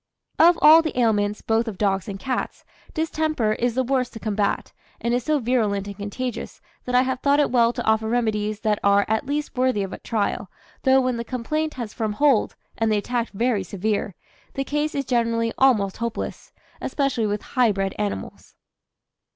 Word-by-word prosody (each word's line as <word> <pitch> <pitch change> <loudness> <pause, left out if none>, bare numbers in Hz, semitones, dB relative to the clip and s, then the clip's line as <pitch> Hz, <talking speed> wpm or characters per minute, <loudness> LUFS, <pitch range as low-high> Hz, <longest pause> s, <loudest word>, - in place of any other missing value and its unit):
Of 345 +1 +7
all 315 +2 +9
the 315 -5 -4
ailments, 210 -3 +1
both 225 +1 +1
of 210 -4 -5
dogs 195 -3 0
and 195 -1 -6
cats, 255 +5 -3 0.3
distemper 310 -8 0
is 235 +1 -1
the 260 - +2
worst 255 0 0
to 225 - -8
combat, 205 -1 -1 0.3
and 235 - -1
is 245 0 0
so 305 -1 +2
virulent 220 -6 0
and 200 0 -7
contagious 215 +5 -5 0.3
that 250 - -1
I 250 - +6
have 260 -1 -2
thought 285 +1 +3
it 290 - +2
well 235 -2 +4
to 240 -1 -4
offer 220 0 +2
remedies 215 -3 -1
that 215 -2 +1
are 200 0 +4
at 220 +5 -1
least 295 +1 -3
worthy 255 -5 +1
of 195 - -6
a - - -7
trial, 205 -3 -2 0.3
though 265 0 +4
when 255 -2 0
the 235 - -3
complaint 305 +7 -2
has 235 -4 -5
firm 220 -3 -2
hold, 275 -1 +2 0.2
and 225 -1 +2
the 215 - +3
attack 235 +3 -2
very 220 -1 0
severe, 200 +1 -2 0.4
the 275 - -1
case 295 +2 -2
is 280 -1 -1
generally 230 -2 0
almost 215 -8 +3
hopeless, 235 0 -5 0.3
especially 270 -6 0
with 205 0 -2
high 250 -4 +4
bred 195 -1 -2
animals. 205 -1 -5
230 Hz, 190 wpm, -23 LUFS, 210-260 Hz, 0.4 s, all